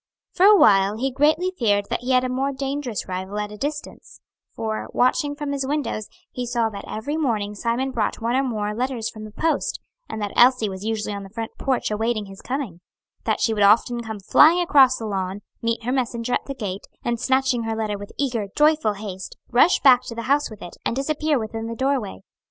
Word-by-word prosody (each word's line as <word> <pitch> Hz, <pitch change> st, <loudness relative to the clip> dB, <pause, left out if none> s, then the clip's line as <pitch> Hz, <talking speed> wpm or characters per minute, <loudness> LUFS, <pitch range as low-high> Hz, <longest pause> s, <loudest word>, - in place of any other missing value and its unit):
For 375 Hz, +2 st, +5 dB
a 420 Hz, 0 st, +8 dB
while 200 Hz, -, +5 dB
he 265 Hz, +3 st, -1 dB
greatly 310 Hz, +7 st, +2 dB
feared 205 Hz, -4 st, +2 dB
that -, -, 0 dB
he 245 Hz, -, -6 dB
had 255 Hz, -1 st, +4 dB
a -, -, 0 dB
more 265 Hz, +2 st, -1 dB
dangerous 270 Hz, -3 st, -3 dB
rival 190 Hz, +2 st, -4 dB
at 210 Hz, 0 st, -3 dB
a -, -, -8 dB
distance; 295 Hz, +4 st, -6 dB, 0.3 s
for, 220 Hz, -1 st, -4 dB
watching 285 Hz, +3 st, +2 dB
from 295 Hz, -1 st, -4 dB
his 280 Hz, -1 st, -1 dB
windows, 285 Hz, -7 st, -2 dB, 0.2 s
he 250 Hz, -, -4 dB
saw 235 Hz, -2 st, +1 dB
that 200 Hz, -2 st, -8 dB
every 285 Hz, +8 st, -3 dB
morning 215 Hz, -9 st, -1 dB
Simon 235 Hz, +5 st, -1 dB
brought -, -, -1 dB
one 235 Hz, +1 st, 0 dB
or 265 Hz, -, +3 dB
more 215 Hz, -5 st, -2 dB
letters 245 Hz, -1 st, -2 dB
from 215 Hz, 0 st, -9 dB
the 215 Hz, -, -10 dB
post, 315 Hz, +6 st, -1 dB, 0.3 s
and 220 Hz, -, -5 dB
that 205 Hz, -1 st, -3 dB
Elsie 245 Hz, -3 st, +5 dB
was 190 Hz, 0 st, -7 dB
usually 215 Hz, -1 st, -2 dB
on 200 Hz, -, -5 dB
the 195 Hz, -, -10 dB
front 225 Hz, +2 st, -5 dB
porch 260 Hz, -5 st, 0 dB
awaiting 220 Hz, 0 st, -1 dB
his 195 Hz, 0 st, -12 dB
coming; 250 Hz, -, -4 dB, 0.4 s
that -, -, 0 dB
she 225 Hz, -, +2 dB
would 210 Hz, -, -1 dB
often 230 Hz, +4 st, +4 dB
come 220 Hz, -2 st, -6 dB
flying 310 Hz, -, +6 dB
across 275 Hz, -7 st, +5 dB
the 225 Hz, -, -6 dB
lawn, 195 Hz, -1 st, -3 dB, 0.2 s
meet 230 Hz, 0 st, -1 dB
her 245 Hz, -, -1 dB
messenger 245 Hz, -2 st, -1 dB
at -, -, 0 dB
the 275 Hz, -, -4 dB
gate, 200 Hz, -6 st, -5 dB, 0.2 s
and 235 Hz, -1 st, 0 dB
snatching 260 Hz, -1 st, +1 dB
her 225 Hz, 0 st, -2 dB
letter 215 Hz, -2 st, -2 dB
with 205 Hz, -, -9 dB
eager, 240 Hz, -7 st, -1 dB
joyful 300 Hz, -7 st, +3 dB
haste, 195 Hz, -2 st, -7 dB
rush 280 Hz, +9 st, +4 dB
back 255 Hz, -3 st, +7 dB
to 230 Hz, -, -7 dB
the 230 Hz, -, -4 dB
house 285 Hz, +4 st, +1 dB
with 215 Hz, -2 st, -11 dB
it, 175 Hz, -, -10 dB
and -, -, -1 dB
disappear 300 Hz, +2 st, 0 dB
within 225 Hz, -1 st, -4 dB
the 230 Hz, -, -5 dB
doorway. 260 Hz, -6 st, -1 dB
235 Hz, 220 wpm, -23 LUFS, 210-270 Hz, 0.4 s, a